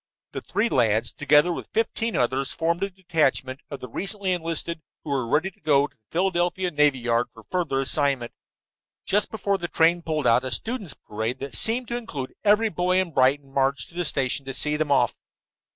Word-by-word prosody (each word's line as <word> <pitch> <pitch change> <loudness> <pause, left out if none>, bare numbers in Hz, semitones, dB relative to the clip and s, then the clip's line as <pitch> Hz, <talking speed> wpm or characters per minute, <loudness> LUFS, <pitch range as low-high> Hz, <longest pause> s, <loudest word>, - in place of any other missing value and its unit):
The - - -5
three 225 - 0
lads, 115 - +2
together 150 +4 +4
with - - -7
fifteen 225 0 0
others, 130 +2 +1
formed 170 +2 -1
a 195 - 0
detachment 160 -8 0
of 140 -2 -7
the 125 - -6
recently 195 - -1
enlisted 165 -1 -2 0.2
who 150 - -5
were 135 +2 +1
to 190 +2 -5
go 145 -5 +2
to - - -13
the - - -42
Philadelphia 180 0 0
Navy 150 -3 +3
Yard 120 0 0
for 115 - -15
further 165 -7 0
assignment. 135 -3 +1 0.7
Just 205 +1 +1
before 200 -3 -1
the 175 - -3
train 170 +1 +3
pulled 155 -4 -2
out 120 +1 +4
a 130 - -3
students' 205 - -2
parade 110 +4 -4
that 135 -2 -5
seemed 230 - 0
to 240 - -1
include 150 - -6
every 215 +2 +4
boy 180 +1 +1
in 185 -3 -1
Brighton 135 +1 +2
marched 135 0 0
to 170 - -16
the 175 - 0
station 140 -3 -1
to 135 - -4
see 150 0 +1
them 150 -1 -1
off. 130 -3 +3
150 Hz, 195 wpm, -25 LUFS, 135-185 Hz, 0.7 s, together